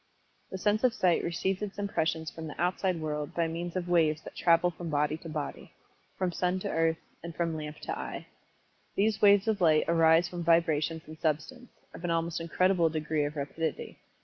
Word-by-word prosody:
The 190 - -5
sense 210 +4 +1
of 250 -3 +3
Sight 180 -2 +2
receives 185 +3 -1
its 205 -2 -5
impressions 160 -5 -1
from 160 -1 -7
the 150 - -9
outside 180 0 0
world 150 -2 -4
by 170 -1 +1
means 170 +2 -5
of 180 -1 -2
waves 160 -3 +3
that - - -9
travel 175 +1 +3
from 170 0 -7
body 150 0 +1
to 165 - -10
body 150 -2 -5 0.4
from 185 -2 0
sun 180 +2 0
to 200 - -3
earth, 165 0 +2 0.2
and 170 -1 -8
from 165 -2 -1
lamp 150 -1 -6
to - - -3
eye. - - -6 0.7
These 215 +1 +1
waves 200 0 +6
of 215 -3 0
light 155 -3 +5
arise 165 +1 +5
from 175 -1 -6
vibrations 165 -1 +2
in 155 0 -11
substance, 160 - -2 0.2
of - - -10
an 175 - -1
almost 165 0 -1
incredible 170 0 +2
degree 155 -1 -1
of 145 +1 -4
rapidity. 150 +2 -4
165 Hz, 195 wpm, -29 LUFS, 160-180 Hz, 0.7 s, waves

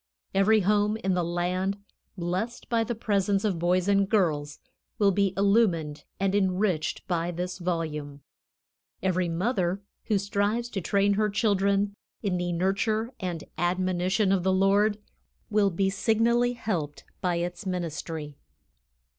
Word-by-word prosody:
Every 210 +3 +4
home 210 +2 +2
in 190 -4 -1
the 180 -1 +1
land 180 +3 -1 0.4
blessed 185 +7 -3
by 230 -1 +2
the 235 +1 -3
presence 200 -2 +1
of 190 -5 0
boys 180 +2 +2
and 200 -1 +3
girls 150 -9 +1 0.4
will 200 -2 +4
be 195 0 +2
illumined 195 -7 +2
and 195 0 +1
enriched 185 -5 0
by 170 -1 0
this 180 +2 -4
volume; 155 -5 -3 0.8
every 185 -2 +1
mother 185 +1 0 0.2
who 215 - +2
strives 205 +4 0
to 200 -5 -3
train 200 +3 +2
her 210 +1 +1
children 200 -1 +1 0.3
"in 190 -3 0
the 175 0 -1
nurture 215 +7 0
and 175 -4 -4 0.2
admonition 185 +3 +1
of 195 -2 +2
the 190 +2 +1
Lord" 200 +2 +3 0.5
will 205 -1 +4
be 195 +2 0
signally 235 +4 +2
helped 170 -11 -3 0.2
by 180 -2 +1
its 175 +4 -3
ministry. 165 -4 -4
190 Hz, 140 wpm, -27 LUFS, 175-205 Hz, 0.8 s, Every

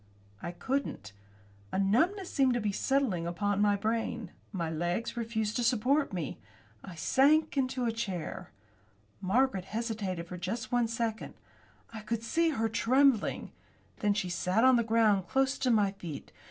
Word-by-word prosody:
I 170 - -4
couldn't. 255 - -3 0.6
A - - -2
numbness 325 - +1
seemed 265 -3 +3
to - - +1
be 210 -2 -1
settling 210 -7 0
on 205 +3 0
my 205 -1 +4
brain. 220 -1 -2 0.2
My 175 -5 -2
legs 175 +9 -2
refused 220 -2 -2
to 245 - 0
support 255 +5 +2
me. 170 -7 -4 0.4
I 180 - -9
sank 290 - +3
into 255 -2 0
a 230 - +1
chair. 195 -8 -4 0.7
Margaret 195 -1 +1
hesitated 210 -6 -3
for 180 +1 -7
just 220 +9 -4
one 245 -1 +2
second. 230 -1 -3 0.6
I 220 - -6
could 225 +1 -3
see 330 +8 +2
her 225 -7 0
trembling. 245 +2 +2 0.5
Then 205 -1 +2
she 190 - -1
sat 180 +5 +1
on 260 0 +7
the 235 - +3
ground 220 -4 +3
close 270 0 +1
to 260 - +1
my 210 -4 +3
feet. 170 -7 -8
225 Hz, 155 wpm, -30 LUFS, 195-255 Hz, 0.7 s, on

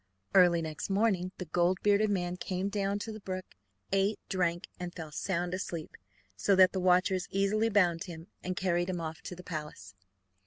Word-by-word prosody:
Early 175 -3 +6
next 155 +3 -5
morning 195 -3 +1
the 180 - -5
gold 175 +3 +2
bearded 210 +1 +4
man 180 -3 0
came 185 +1 -2
down 200 0 0
to 225 - -5
the 215 - -7
brook, 185 -2 -5 0.5
ate, 195 +2 +2
drank, 175 -3 0
and 180 -1 -4
fell 160 -3 -8
sound 175 +2 -2
asleep, 170 -4 -4 0.4
so 190 - +3
that 185 0 +7
the 190 - -2
watchers 185 +1 +3
easily 205 +3 +2
bound 175 -6 +3
him, 165 -3 -8 0.2
and 185 0 -3
carried 175 -1 +1
him 180 -2 -2
off 160 -1 -5
to 180 - -7
the 180 - -11
palace. 150 - -6
185 Hz, 185 wpm, -31 LUFS, 175-195 Hz, 0.5 s, that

